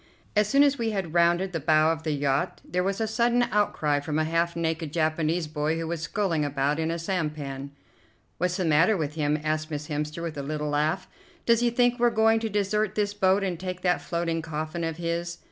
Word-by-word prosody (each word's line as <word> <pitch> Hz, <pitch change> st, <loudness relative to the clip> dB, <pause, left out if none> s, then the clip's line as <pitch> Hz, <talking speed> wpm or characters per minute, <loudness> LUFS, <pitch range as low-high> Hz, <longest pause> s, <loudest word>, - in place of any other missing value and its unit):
As 210 Hz, -1 st, +4 dB
soon 280 Hz, +4 st, +5 dB
as 280 Hz, -2 st, +2 dB
we 230 Hz, -1 st, 0 dB
had 190 Hz, -6 st, -3 dB
rounded 175 Hz, +2 st, +3 dB
the 165 Hz, -, -2 dB
bow 155 Hz, +1 st, +4 dB
of 160 Hz, -1 st, -3 dB
the 160 Hz, -1 st, -2 dB
yacht 140 Hz, -1 st, 0 dB
there 180 Hz, +3 st, 0 dB
was 195 Hz, +2 st, -1 dB
a 225 Hz, -, +1 dB
sudden 240 Hz, +2 st, +2 dB
outcry 155 Hz, -8 st, +1 dB
from 150 Hz, +1 st, -3 dB
a 155 Hz, -, +2 dB
half 165 Hz, +2 st, 0 dB
naked 160 Hz, -2 st, -2 dB
Japanese 160 Hz, +1 st, 0 dB
boy 155 Hz, +1 st, -1 dB
who 165 Hz, -, -3 dB
was 165 Hz, -1 st, -3 dB
sculling 165 Hz, -1 st, 0 dB
about 145 Hz, +1 st, 0 dB
in 160 Hz, 0 st, 0 dB
a 165 Hz, -, -1 dB
sampan. 150 Hz, -6 st, -3 dB, 0.7 s
"What's 180 Hz, +1 st, 0 dB
the 185 Hz, -, -1 dB
matter 165 Hz, +7 st, +4 dB
with 150 Hz, -3 st, -2 dB
him?" 150 Hz, -1 st, 0 dB
asked 155 Hz, 0 st, -1 dB
Miss 150 Hz, 0 st, -5 dB
Hemster 150 Hz, +2 st, -3 dB
with 160 Hz, -3 st, -4 dB
a -, -, -2 dB
little 150 Hz, +1 st, -3 dB
laugh. 155 Hz, +5 st, 0 dB, 0.4 s
"Does 235 Hz, -1 st, +4 dB
he 240 Hz, 0 st, +3 dB
think 245 Hz, +1 st, +2 dB
we're 240 Hz, 0 st, +5 dB
going 225 Hz, 0 st, +3 dB
to 225 Hz, 0 st, -2 dB
desert 210 Hz, 0 st, 0 dB
this 205 Hz, -1 st, 0 dB
boat 195 Hz, 0 st, +2 dB
and 180 Hz, -4 st, -2 dB
take 180 Hz, 0 st, -5 dB
that 180 Hz, -1 st, +1 dB
floating 170 Hz, -1 st, -2 dB
coffin 160 Hz, +1 st, -4 dB
of 165 Hz, -1 st, -2 dB
his?" 170 Hz, 0 st, -3 dB
165 Hz, 220 wpm, -26 LUFS, 155-195 Hz, 0.7 s, soon